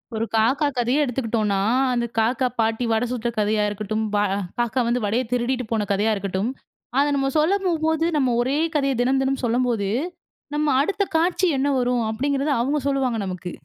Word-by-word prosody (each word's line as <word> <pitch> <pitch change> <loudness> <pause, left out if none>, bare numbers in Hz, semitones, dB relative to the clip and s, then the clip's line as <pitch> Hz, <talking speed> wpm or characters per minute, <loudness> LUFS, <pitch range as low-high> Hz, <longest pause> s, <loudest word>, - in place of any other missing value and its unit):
ஒரு 225 - -1
காக்கா 260 +7 +3
கதையே 245 +5 +2
எடுத்துக்குட்டோம்னா, 225 -6 0 0.3
அந்த 240 -1 0
காக்கா, 245 +3 +2
பாட்டி 225 +2 +1
வட 220 +1 +2
சுட்ட 240 -2 -2
கதையா 210 0 +1
இருக்கட்டும், 215 +1 -3
பா 205 - +3
ஆ - - -1 0.2
காக்கா 240 +2 0
வந்து 240 0 0
வடைய 225 +5 +1
திருடிட்டு 250 +1 0
போன 220 -2 0
கதையா 210 +2 +2
இருக்கட்டும். 195 +2 -2 0.5
அத 285 - +4
நம்ம 270 -1 +1
சொல்ல 330 +6 +3
போம்போது, 320 -2 +1
நம்ம 260 -4 +2
ஒரே 260 +4 0 0.2
கதைய 275 -2 +2
தினம் 265 +2 +2
தினம் 270 0 -1
சொல்லம்போது, 235 -4 0 0.7
நம்ம 300 0 +1
அடுத்த 400 +7 0
காட்சி 355 +3 +2
என்ன 275 - +1
வரும் 245 -1 +1
அப்டிங்கிறத 280 +5 -1
அவுங்க 285 +4 0
சொல்லுவாங்க, 265 -4 0
நமக்கு. 180 -1 -5
245 Hz, 170 wpm, -23 LUFS, 220-275 Hz, 0.7 s, அத